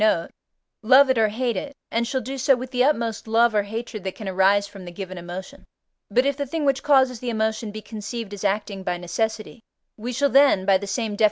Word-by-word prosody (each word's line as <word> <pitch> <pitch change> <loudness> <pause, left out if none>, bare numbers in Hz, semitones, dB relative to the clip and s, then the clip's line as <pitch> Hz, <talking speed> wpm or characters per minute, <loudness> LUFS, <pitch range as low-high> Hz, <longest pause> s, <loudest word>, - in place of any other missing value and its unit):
note) 215 -6 +2 0.5
love 265 +4 +6
it 260 - 0
or 220 - +4
hate 235 +2 -1
it, 285 +9 -5 0.2
and 235 +1 0
shall 260 +1 -1
do 265 +2 -5
so 270 +1 +3
with 255 +1 -7
the 250 -1 +2
utmost 230 -7 0
love 230 +1 +3
or 210 - +3
hatred 215 0 -6
that 190 -1 -4
can 215 - -8
arise 190 +2 +3
from 200 -2 -11
the 175 - -8
given 185 +1 -7
emotion. 185 +10 -8 0.5
But 250 +6 +2
if 280 0 +1
the 285 0 -4
thing 310 +2 -2
which 275 -1 +2
causes 265 -4 +3
the 250 - -4
emotion 220 -1 -1
be 215 +1 -8
conceived 220 0 -6
as 205 - -7
acting 200 -1 -1
by 180 -1 -2
necessity, 215 +6 -3 0.4
we 235 +3 -5
shall 280 +3 +1
then 275 -9 +5
(by 195 -1 +4
the 200 - -6
same 220 +2 -2
Def. - - -15
220 Hz, 235 wpm, -23 LUFS, 200-255 Hz, 0.5 s, love